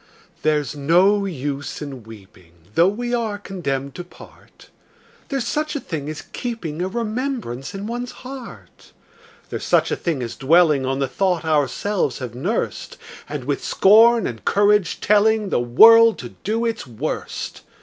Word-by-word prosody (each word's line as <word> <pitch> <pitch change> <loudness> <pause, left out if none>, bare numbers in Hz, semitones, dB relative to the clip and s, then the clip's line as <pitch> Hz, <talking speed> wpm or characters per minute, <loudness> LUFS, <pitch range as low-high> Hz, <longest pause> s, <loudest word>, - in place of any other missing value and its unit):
There's 150 -1 0
no 185 +8 +3
use 145 -4 -4
in 140 -4 -7
weeping, 95 -6 -15 0.2
Though 170 +7 +5
we 240 +5 -2
are 225 -4 -1
condemned 140 -9 -4
to 175 - -7
part: 175 - -17 0.6
There's 270 -4 -2
such 305 +5 -2
a - - -1
thing 155 - -5
as 155 - -6
keeping 180 -10 -4
A 185 - 0
remembrance 225 - -4
in 195 +1 -5
one's 240 +2 -4
heart: 260 -2 -11 0.6
There's - - -4
such - - +2
a - - +1
thing 155 -7 -2
as 115 - -5
dwelling 150 -2 +3
On 135 0 -1
the 135 -1 0
thought 180 -2 -1
ourselves 150 - 0
have 125 -4 -6
nursed, 175 - -3 0.3
And - - -5
with - - -2
scorn 225 +2 +5
and 115 -3 -5
courage 205 -1 +2
telling 210 0 +3
The - - +1
world 225 - +7
to - - -8
do 225 +3 -3
its 225 - -3
worst. 125 +6 -5
180 Hz, 155 wpm, -21 LUFS, 140-225 Hz, 0.6 s, world